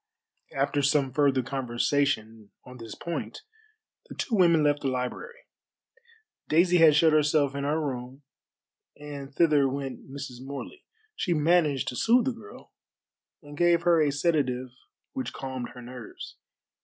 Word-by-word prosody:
After 145 +1 0
some 140 -2 +1
further 135 -2 +2
conversation 120 -3 -1 0.2
on 125 0 -11
this 115 -2 -9
point 170 - -6 0.7
the - - -9
two 240 - -4
women 170 -6 +4
left 145 0 +2
the 140 - -1
library. 130 - -4 1.1
Daisy 175 +3 +4
had 160 -3 +6
shut 160 +1 +5
herself 150 -2 +3
in 140 0 -3
her 150 +2 0
room, 130 -1 -5 0.8
and 145 -2 -8
thither 145 -3 +3
went 135 0 -6
Mrs. 135 -2 -7
Morley. 140 - -8 0.3
She 180 - 0
managed 155 -3 +2
to 125 - -6
sooth 235 - +3
the 265 - +1
girl, 255 - -13 0.7
and 145 0 -11
gave 170 +1 +3
her 170 -2 +4
a 150 -2 +2
sedative 140 -4 0 0.4
which 265 -1 -4
calmed 130 -2 -5
her 125 - -10
nerves. 125 -2 -10
145 Hz, 145 wpm, -27 LUFS, 130-165 Hz, 1.1 s, had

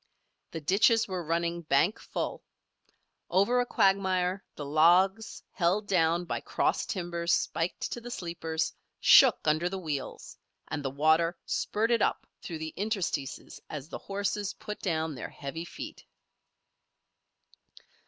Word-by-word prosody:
The 160 - -6
ditches 220 +7 +3
were 185 -3 -3
running 170 +1 -1
bank 165 +5 +2
full. - - -4 0.9
Over 200 +7 +3
a 245 - +1
quagmire 190 -2 +2
the 145 - -6
logs, 180 +8 +3
held 195 +4 +1
down 175 -2 +2
by - - -2
cross - - 0
timbers 170 -3 -2
spiked 165 +2 -1
to 240 - -4
the 240 - -8
sleepers, 165 -6 -3 0.3
shook - - +7
under 155 +3 +2
the 195 - -4
wheels, 150 -7 -5 0.3
and 145 -1 -3
the 135 - -1
water 160 +5 +2
spurted 225 +1 0
up - - +1 0.2
through 165 - -6
the 160 0 -6
interstices 195 - -3
as 150 0 -6
the - - -6
horses 200 0 -3
put 210 - -7
down 160 -4 -1
their 125 - -6
heavy 160 +4 -6
feet. - - -8
175 Hz, 135 wpm, -29 LUFS, 160-195 Hz, 0.9 s, shook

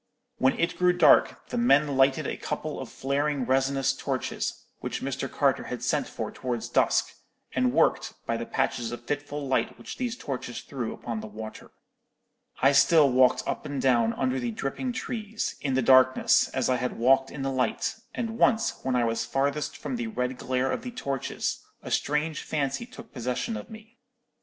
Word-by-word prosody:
"When 130 - +3
it 170 - 0
grew 180 0 +4
dark, - - +4
the 245 - -1
men 145 - +4
lighted 135 0 +3
a - - -2
couple - - -4
of - - -6
flaring 140 0 -1
resinous 135 +1 +2
torches, 135 -1 -3
which - - -4
Mr. - - -3
Carter - - +1
had - - -5
sent - - 0
for - - -5
towards 120 -3 -4
dusk, - - +2 0.4
and 125 -1 +2
worked, - - +2
by 115 - -1
the 115 0 -4
patches 120 -1 -1
of 120 0 -7
fitful 145 0 -3
light 130 - 0
which - - -8
these 245 -1 -2
torches 125 -3 -5
threw 125 -5 -4
upon 115 -2 -5
the 110 - -7
water. 110 +1 -9 0.9
I 135 - +7
still 145 0 +5
walked 125 0 +4
up - - -3
and 145 -2 -3
down 120 -3 +3
under 130 0 0
the 120 -1 -2
dripping 135 - -3
trees, 220 -3 -4
in 135 -3 0
the 130 - +2
darkness, 130 +1 +5
as 130 -2 -1
I 130 - +2
had 125 - -3
walked 135 +3 +4
in 140 - -6
the 135 - -1
light; 130 -1 0 0.2
and 230 -1 -3
once 230 -1 +2
when 130 -1 0
I 120 - +3
was 115 0 0
farthest 140 +2 -1
from 255 - -4
the 235 -1 -3
red 130 - -2
glare 130 +1 -1
of - - -2
the 250 - -5
torches, 140 - -3 0.2
a - - -7
strange 150 +1 0
fancy 145 - -2
took 230 -3 -13
possession 125 - -2
of - - -7
me. 220 +2 -13
135 Hz, 185 wpm, -27 LUFS, 125-155 Hz, 0.9 s, I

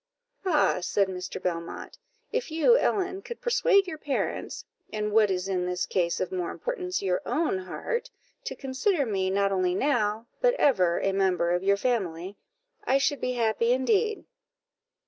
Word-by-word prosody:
"Ah!" 300 - +3
said 195 +2 +1
Mr. 185 0 -5
Belmont, 175 - -5 0.3
"if 485 -2 -2
you, 325 +10 +4
Ellen, 385 -5 0
could 475 +2 -8
persuade 475 -5 +3
your 320 -4 -6
parents, 285 -3 -3 0.3
and, 210 -1 -2
what 215 -1 +4
is 185 0 -1
in 180 -2 -1
this 180 0 -1
case 170 -2 0
of 185 - -2
more 180 -2 -2
importance, 370 - -3
your 180 -2 0
own 305 - 0
heart, 470 - -4 0.4
to - - -4
consider 280 +4 0
me 190 -4 0
not 200 +1 +1
only 185 -2 +1
now, 225 -3 +1 0.2
but - - +4
ever, 185 - +3
a 195 - +1
member 185 -3 +1
of 175 0 +1
your 200 +1 +3
family, 195 -6 -2 0.5
I 265 - +3
should 280 +1 0
be 250 - -1
happy 230 0 +2
indeed." 415 - +1
220 Hz, 165 wpm, -27 LUFS, -, 0.5 s, you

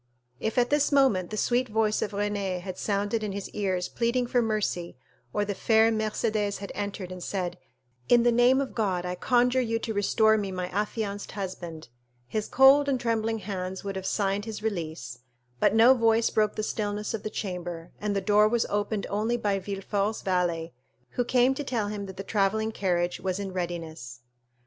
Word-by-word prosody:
If 220 - -2
at 245 +1 +3
this 295 0 +3
moment 260 -11 +3
the 215 - -5
sweet 245 +3 +1
voice 215 0 +1
of - - -1
Renée 200 -2 -2
had 185 0 -7
sounded 205 +2 0
in 205 -2 -3
his 200 0 -5
ears 185 -3 -1
pleading 240 +1 0
for 245 0 +2
mercy, 210 - -2 0.3
or 205 - 0
the 205 - -2
fair 220 +2 +4
Mercédès 215 -1 -1
had 200 - -7
entered 200 -3 -4
and 185 0 -7
said, 180 -4 -3 0.5
"In 240 -1 +6
the 240 - +4
name 245 +3 +5
of 270 - -4
God, 190 -6 -1
I 180 - -2
conjure 245 +6 +2
you 230 -2 0
to 225 0 -4
restore 220 +2 +3
me 200 -2 -3
my 180 -1 -3
affianced 205 0 -3
husband," 175 - -6 0.4
his 215 - -2
cold 275 +2 +6
and 265 -2 +1
trembling 225 -1 0
hands 190 -2 -5
would 195 -1 -4
have 190 0 -4
signed 200 0 0
his 215 -1 -6
release; 160 - -4 0.4
but - - +3
no 230 +4 +8
voice 230 -2 +3
broke 215 -1 +1
the 215 - -2
stillness 210 0 -2
of 220 - -3
the 215 - -4
chamber, 175 -5 -5
and 205 -1 -1
the 200 - +1
door 210 +2 +4
was 235 +1 +1
opened 205 0 -1
only 220 +4 0
by 205 -4 0
Villefort's 200 +2 -2
valet, 175 -3 0 0.4
who 245 - 0
came 250 +2 +3
to 290 - -4
tell 230 -6 -1
him 205 -1 -5
that 190 -1 -9
the 195 - -4
travelling 215 +2 +1
carriage 175 -4 0
was 185 -1 -2
in 195 -2 -4
readiness. 165 -8 -5
205 Hz, 190 wpm, -27 LUFS, 190-225 Hz, 0.5 s, no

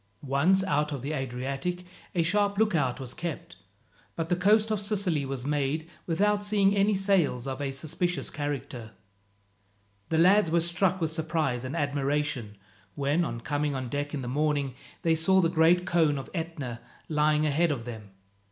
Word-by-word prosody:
Once 160 +9 +3
out 150 -4 0
of 140 -4 -4
the 145 - -3
Adriatic 135 +6 -3 0.3
a 170 - +3
sharp 200 +3 +1
lookout 165 - +1
was 130 -2 -6
kept, 170 -4 -6 0.6
but 165 0 -3
the 175 - +3
coast 210 +4 +3
of 210 -2 0
Sicily 190 -9 0
was 135 -2 -4
made 150 +2 -1 0.2
without 205 +4 +2
seeing 205 -1 +3
any 200 +1 +3
sails 190 -10 +1
of 135 +1 -4
a 140 - -1
suspicious 165 +5 -2
character. 140 -6 -5 1.2
The 160 - +1
lads 185 +2 +5
were 170 +1 +3
struck 175 +2 0
with 160 -1 0
surprise 155 -6 -1
and 130 +2 -4
admiration 140 -6 -1 0.4
when, 145 +4 +1
on 120 -7 -4
coming 145 +2 -1
on 130 -2 -4
deck 145 +3 -3
in 135 - -4
the - - -5
morning, 145 0 0 0.3
they 165 - +3
saw 175 +4 +4
the 170 -3 +3
great 170 +2 +4
cone 160 -5 +2
of 135 - -7
Etna 155 -9 -4 0.3
lying 150 0 +2
ahead 155 +3 +2
of 125 -6 -3
them. 110 -4 -8
155 Hz, 170 wpm, -28 LUFS, 140-180 Hz, 1.2 s, lads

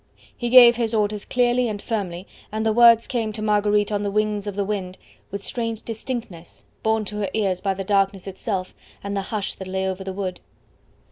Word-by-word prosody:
He 240 - -3
gave 240 -1 +9
his 230 -1 0
orders 210 -1 0
clearly 245 -1 +2
and 210 -1 -4
firmly, 190 -5 -4 0.3
and 220 +1 -2
the 220 - +3
words 235 0 +7
came 230 -4 -2
to 215 - -6
Marguerite 210 0 +2
on 205 -1 0
the 205 - -1
wings 210 0 0
of 205 - -4
the 200 - 0
wind 190 -3 -4 0.3
with 200 0 -6
strange 230 -2 -3
distinctness, 225 -7 -7 0.2
borne 220 -1 +1
to 210 +1 -6
her 205 -2 -1
ears 195 -4 0
by 195 -1 0
the 195 - -4
darkness 195 -1 +1
itself, 190 -1 -4 0.3
and 200 0 -3
the 195 - 0
hush 210 -3 -2
that 190 - -9
lay 190 0 -1
over 190 0 -3
the 190 - -4
wood. 185 -1 -4
210 Hz, 205 wpm, -23 LUFS, 195-225 Hz, 0.3 s, gave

